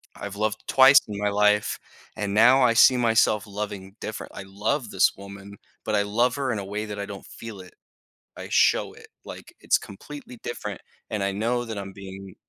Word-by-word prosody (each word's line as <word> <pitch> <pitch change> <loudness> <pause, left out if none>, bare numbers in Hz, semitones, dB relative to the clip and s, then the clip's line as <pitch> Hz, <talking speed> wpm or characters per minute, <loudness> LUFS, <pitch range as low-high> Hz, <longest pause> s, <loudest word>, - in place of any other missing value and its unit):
I've 100 -1 -7
loved 105 +1 -2
twice 135 +1 +7
in 105 - -6
my 105 0 0
life, 105 0 +2 0.4
and 105 -2 -2
now 125 +5 +6
I 120 -2 +4
see 125 +2 +6
myself 110 -3 +2
loving 100 -1 -6
different 110 - -7
I - - -7
love 105 +5 -2
this 95 - +4
woman, 100 0 -11 0.3
but 110 - 0
I 100 - +2
love 120 +4 +1
her 135 -3 -1
in 110 - -2
a 100 - -6
way 105 +2 -4
that 105 -1 -7
I 100 - -3
don't 100 -1 -9
feel 115 -3 -10
it. 90 - -15 0.6
I - - -8
show - - +3
it, - - -15 0.2
like, - - -11
it's - - +3
completely 125 +4 -11
different, 105 -5 -6 0.3
and 105 -2 -2
I 100 0 0
know 115 +4 -1
that 110 -3 -6
I'm 95 -1 -7
being 95 -1 -10
105 Hz, 200 wpm, -25 LUFS, 100-115 Hz, 0.6 s, twice